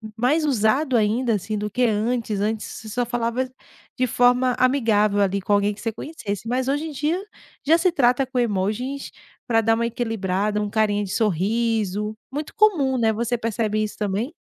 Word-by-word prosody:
mais 275 Hz, +8 st, +2 dB
usado 260 Hz, +2 st, +2 dB
ainda, 230 Hz, +2 st, +2 dB
assim, 210 Hz, +1 st, -2 dB
do 210 Hz, -, -2 dB
que 250 Hz, +3 st, 0 dB
antes 220 Hz, -1 st, -1 dB
antes, 215 Hz, +1 st, -1 dB
você 220 Hz, -, -9 dB
só 245 Hz, +3 st, -1 dB
falava 240 Hz, +2 st, -1 dB, 0.5 s
de 255 Hz, -, +2 dB
forma 245 Hz, +1 st, +3 dB
amigável 220 Hz, -6 st, +3 dB
ali 200 Hz, 0 st, +1 dB
com 195 Hz, -, -4 dB
alguém 205 Hz, +1 st, +2 dB
que 205 Hz, -, -13 dB
você 225 Hz, -, -2 dB
conhecesse, 220 Hz, -, -6 dB
mas 250 Hz, +2 st, -1 dB
hoje 290 Hz, +3 st, 0 dB
em 320 Hz, -, -5 dB
dia 300 Hz, +5 st, -1 dB, 0.5 s
já 315 Hz, +3 st, +5 dB
se 365 Hz, +1 st, +3 dB
trata 255 Hz, -4 st, +3 dB
com 260 Hz, 0 st, -5 dB
emojis 235 Hz, +5 st, -1 dB, 0.4 s
para 225 Hz, -2 st, +3 dB
dar 225 Hz, 0 st, +3 dB
uma 235 Hz, +1 st, 0 dB
equilibrada, 210 Hz, -3 st, -1 dB
um 210 Hz, -, -2 dB
carinha 205 Hz, -1 st, +1 dB
de 195 Hz, -, -6 dB
sorriso, 210 Hz, +1 st, 0 dB, 0.2 s
muito 295 Hz, +2 st, -5 dB
comum 285 Hz, -, +3 dB
né 225 Hz, -1 st, +3 dB
você 235 Hz, +2 st, -1 dB
percebe 220 Hz, -2 st, -1 dB
isso 215 Hz, -, -4 dB
também? 210 Hz, -, -2 dB
225 Hz, 185 wpm, -23 LUFS, 210-255 Hz, 0.5 s, já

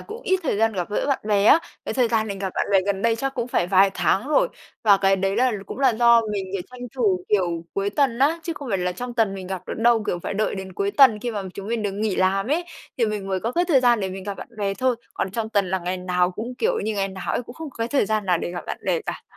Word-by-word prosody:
cũng 445 Hz, +3 st, -9 dB
ít 375 Hz, 0 st, +1 dB
thời 265 Hz, -, 0 dB
gian 225 Hz, +1 st, +2 dB
gặp 180 Hz, 0 st, -3 dB
gỡ -, -, -1 dB
bạn 275 Hz, -, +1 dB
bè 205 Hz, -1 st, +3 dB
á, 300 Hz, -, +7 dB, 0.3 s
cái -, -, -3 dB
thời 250 Hz, -3 st, +2 dB
gian 220 Hz, -2 st, +1 dB
mình 195 Hz, -1 st, -4 dB
gặp 190 Hz, -2 st, -3 dB
bạn -, -, 0 dB
bè 195 Hz, -, +6 dB
gần 200 Hz, 0 st, -1 dB
đây 230 Hz, -1 st, +2 dB
chắc 270 Hz, +3 st, -3 dB
cũng 240 Hz, -1 st, -3 dB
phải 175 Hz, -, +1 dB
vài 195 Hz, +1 st, +5 dB
tháng 205 Hz, +8 st, +1 dB
rồi. -, -, +3 dB, 0.4 s
Và 200 Hz, -2 st, +7 dB
cái 195 Hz, 0 st, +3 dB
đấy 195 Hz, +2 st, -1 dB
là 250 Hz, 0 st, +3 dB
cũng -, -, -7 dB
là 270 Hz, -2 st, +4 dB
do 235 Hz, 0 st, +5 dB
mình, 195 Hz, -2 st, -2 dB
kiểu, 190 Hz, -2 st, -2 dB
tranh 250 Hz, -1 st, -11 dB, 0.2 s
thủ, 190 Hz, -7 st, +1 dB
kiểu, 175 Hz, -5 st, 0 dB
cuối 200 Hz, +1 st, 0 dB
tuần 255 Hz, -2 st, +1 dB
á, 305 Hz, +5 st, +3 dB
chứ 335 Hz, -, -3 dB
không 280 Hz, -4 st, -8 dB
phải 195 Hz, -3 st, 0 dB
là 180 Hz, 0 st, -1 dB
trong 245 Hz, +5 st, -6 dB
tuần 220 Hz, -5 st, +1 dB
mình 190 Hz, -1 st, -7 dB
gặp 190 Hz, -1 st, -5 dB
được -, -, -4 dB
đâu. 230 Hz, -1 st, +4 dB
Kiểu, 175 Hz, -, -1 dB
phải 195 Hz, -, -5 dB
đợi 215 Hz, 0 st, 0 dB
đến 190 Hz, -1 st, -7 dB
cuối 200 Hz, +2 st, -1 dB
tuần 255 Hz, -5 st, +6 dB
khi 240 Hz, -, -2 dB
mà 205 Hz, -3 st, -3 dB
chúng 200 Hz, 0 st, -7 dB
mình 230 Hz, -2 st, -1 dB
được 200 Hz, -1 st, -1 dB
nghỉ 205 Hz, -1 st, -1 dB
làm 195 Hz, +2 st, +2 dB
ấy, 335 Hz, +4 st, +1 dB, 0.3 s
thì 230 Hz, -, +3 dB
mình 205 Hz, -2 st, -3 dB
mới 190 Hz, -1 st, -1 dB
có 230 Hz, +2 st, -2 dB
cái 350 Hz, +1 st, +2 dB
thời 295 Hz, -7 st, +4 dB
gian 240 Hz, -3 st, +4 dB
để 190 Hz, -, -1 dB
mình 190 Hz, 0 st, -7 dB
gặp 200 Hz, -1 st, -4 dB
bạn -, -, -9 dB
bè 200 Hz, -1 st, -1 dB
thôi. 255 Hz, +2 st, +1 dB, 0.2 s
Còn 190 Hz, -, -2 dB
trong 220 Hz, +1 st, -3 dB
tuần 200 Hz, -4 st, +1 dB
là 190 Hz, -, +1 dB
ngày 180 Hz, +1 st, -3 dB
nào 180 Hz, 0 st, 0 dB
cũng 235 Hz, +7 st, -6 dB
kiểu 465 Hz, 0 st, +1 dB
như 220 Hz, -, -2 dB
ngày 195 Hz, -1 st, 0 dB
nào 190 Hz, -1 st, -5 dB
ấy, -, -, -1 dB
cũng 240 Hz, +1 st, -12 dB
không 320 Hz, -3 st, -7 dB
có -, -, -19 dB
cái 230 Hz, +1 st, -1 dB
thời 275 Hz, -7 st, +2 dB
gian 215 Hz, -2 st, -1 dB
nào 175 Hz, -2 st, +2 dB
để -, -, -4 dB
gặp 175 Hz, 0 st, -6 dB
bạn -, -, -4 dB
bè -, -, +1 dB
cả. -, -, -4 dB
210 Hz, 310 wpm, -23 LUFS, 195-245 Hz, 0.4 s, á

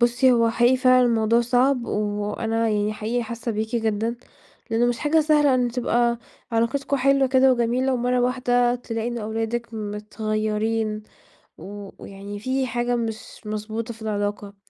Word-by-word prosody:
بُصّي، 240 Hz, +2 st, +4 dB
هو 230 Hz, -1 st, +3 dB
حقيقي 240 Hz, +3 st, +3 dB
فعلًا 255 Hz, -1 st, +5 dB
الموضوع 230 Hz, 0 st, +3 dB
صعب، 250 Hz, +1 st, +2 dB
وأنا 210 Hz, +2 st, -1 dB
يعني 210 Hz, 0 st, 0 dB
حقيقي 225 Hz, +3 st, -2 dB
حاسة 230 Hz, 0 st, -4 dB
بيكِ 220 Hz, +3 st, -2 dB
جدًا، 225 Hz, +1 st, -1 dB, 0.5 s
لإنه 230 Hz, +2 st, +2 dB
مش 240 Hz, -1 st, 0 dB
حاجة 310 Hz, +2 st, +2 dB
سهلة 295 Hz, -3 st, +3 dB
إن 245 Hz, -1 st, +1 dB
تبقى 240 Hz, -1 st, +1 dB, 0.3 s
علاقتكم 275 Hz, +5 st, 0 dB
حلوة 275 Hz, +1 st, +3 dB
كده 260 Hz, 0 st, +5 dB
وجميلة، 250 Hz, +2 st, +1 dB
ومرة 250 Hz, 0 st, +1 dB
واحدة 245 Hz, -1 st, +2 dB
تلاقي 230 Hz, -1 st, -4 dB
إنه 235 Hz, -2 st, -4 dB
أولادِك 225 Hz, +2 st, -3 dB
متغيرين 215 Hz, +1 st, -2 dB, 0.6 s
و 200 Hz, 0 st, -9 dB
ويعني 200 Hz, +1 st, -8 dB
في 260 Hz, +4 st, -1 dB
حاجة 240 Hz, 0 st, -1 dB
مش 225 Hz, -1 st, -5 dB
مضبوطة 215 Hz, +2 st, -4 dB
في 220 Hz, -, -14 dB
العلاقة. 205 Hz, -1 st, -3 dB
230 Hz, 145 wpm, -23 LUFS, 215-250 Hz, 0.6 s, فعلًا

